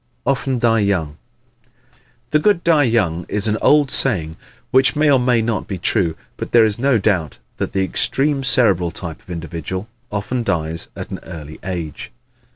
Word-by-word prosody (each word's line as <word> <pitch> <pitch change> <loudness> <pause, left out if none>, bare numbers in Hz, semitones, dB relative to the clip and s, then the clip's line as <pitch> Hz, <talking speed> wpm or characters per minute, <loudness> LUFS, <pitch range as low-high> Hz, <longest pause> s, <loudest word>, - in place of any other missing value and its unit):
Often 135 0 0
Die 115 -1 +3
Young 90 -8 0 0.8
¶ - - -28 0.3
"The 150 - +4
good 190 0 +2
die 155 -4 +4
young" 95 -8 +1
is 105 +1 0
an 110 0 0
old 145 -2 +4
saying 85 -11 +1 0.4
which 130 +3 +4
may 150 0 +3
or 135 - +5
may 125 -2 +2
not 110 -3 -2
be 95 - -4
true. 85 -1 0 0.2
But - - -6
there 115 -2 +7
is 110 0 0
no 135 -1 +3
doubt 95 -7 0 0.2
that - - -3
the 95 - +1
extreme 135 +8 0
Cerebral 100 -9 +3
type 85 -2 -7
of - - -23
individual 85 +3 -5 0.2
often 105 +5 -2
dies 80 -5 -2
at - - -7
an - - -5
early 80 -3 -9
age. 85 -6 -5
105 Hz, 175 wpm, -19 LUFS, 85-130 Hz, 0.8 s, there